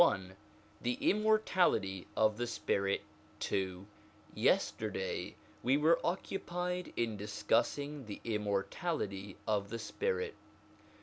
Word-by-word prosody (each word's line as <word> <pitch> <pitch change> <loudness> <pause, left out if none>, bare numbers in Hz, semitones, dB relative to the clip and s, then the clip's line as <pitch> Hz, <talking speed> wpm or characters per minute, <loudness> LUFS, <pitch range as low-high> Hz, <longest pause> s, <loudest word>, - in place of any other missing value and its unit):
LXI 95 - +4 0.5
THE 125 0 0
IMMORTALITY 185 - +2
OF 110 -1 +4
THE 120 0 -1
SPIRIT 100 -4 0 0.5
(II) 95 -1 -1 0.5
YESTERDAY - - +1 0.3
we 130 +3 +4
were 160 +3 +5
occupied 180 0 -2
in 115 -3 0
discussing 140 +6 0
the 105 - -6
immor 105 -3 +1
tality 100 - -3
of 100 -2 +1
the 115 - -3
spirit. 460 - -1
115 Hz, 105 wpm, -34 LUFS, -, 0.5 s, were